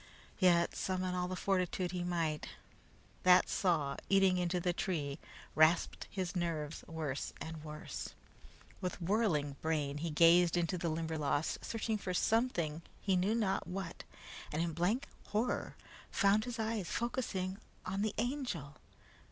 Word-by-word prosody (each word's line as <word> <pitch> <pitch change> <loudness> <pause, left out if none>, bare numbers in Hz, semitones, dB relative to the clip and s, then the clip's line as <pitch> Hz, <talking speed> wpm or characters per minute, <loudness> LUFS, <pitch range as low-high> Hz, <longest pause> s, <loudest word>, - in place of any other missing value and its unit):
Yet, 175 -3 +4
summon 185 -1 -1
all 180 0 0
the 185 - -3
fortitude 185 -1 0
he 180 -1 -2
might, 165 -4 -1 0.7
that 180 0 +6
saw 155 -7 +1
eating 195 -2 +5
into 180 0 +1
the 175 0 +1
tree 155 -6 -2 0.3
rasped 155 +2 +3
his 185 -1 -3
nerves 165 -3 -2
worse 155 -4 -3
and 160 -1 -6
worse. 150 0 -6 0.7
With 180 -1 -3
whirling 170 -7 +1
brain 150 -3 0
he 165 +2 -2
gazed 170 +2 +6
into 175 +1 +1
the 170 -1 -1
Limberlost, 155 -2 -1
searching 220 -1 -1
for 185 -2 -3
something, 175 -9 +1 0.2
he 195 -2 +1
knew 190 +5 +2
not 205 -4 0
what, 180 -2 -5 0.5
and 150 - -2
in 170 -1 -2
blank 180 - +1 0.2
horror 220 +4 -1 0.3
found 205 +1 +3
his 245 -1 -4
eyes 220 -4 -1
focusing 200 -6 -2 0.3
on 195 +2 -1
the 215 -1 0
Angel. 230 - -2
180 Hz, 140 wpm, -34 LUFS, 160-195 Hz, 0.7 s, that